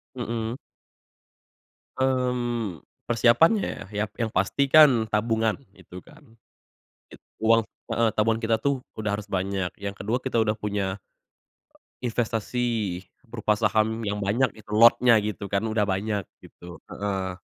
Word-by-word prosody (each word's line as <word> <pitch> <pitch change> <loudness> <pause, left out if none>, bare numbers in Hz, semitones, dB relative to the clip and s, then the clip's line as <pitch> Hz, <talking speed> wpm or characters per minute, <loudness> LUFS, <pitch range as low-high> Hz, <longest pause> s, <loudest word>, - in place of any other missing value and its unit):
Mhm. 115 -2 -3 1.4
Mmm, 120 - -1 0.2
persiapannya 120 - +3
ya, 105 +1 -2 0.2
yang 115 - +1
pasti 110 +7 0
kan 135 -7 +6
tabungan 110 0 +1 0.2
gitu 90 -2 -13
kan. 120 -7 -19 0.8
Git - - -13 0.2
uang 115 0 +4 0.2
heeh 115 0 +2
tabungan 110 +1 +2
kita 115 -1 +1
tuh 135 +4 -1 0.2
udah 105 -1 -2
harus 105 - -10
banyak, 95 -1 -1 0.2
yang 100 - -2
ke-2 100 +4 -3
kita 130 -3 0
udah 110 -1 +1
punya 100 -3 -2 1.1
investasi 115 -4 -2 0.2
berupa 110 -2 0
saham 110 +1 +1
yang 105 -1 -2
banyak 105 +6 +1 0.2
lotnya 115 +3 +6
gitu 105 -1 -4
kan 100 0 -1
udah 110 -1 +1
banyak 100 0 -2 0.2
gitu 85 -2 -13
heeh. 95 -2 -3
110 Hz, 125 wpm, -25 LUFS, 100-120 Hz, 1.4 s, kan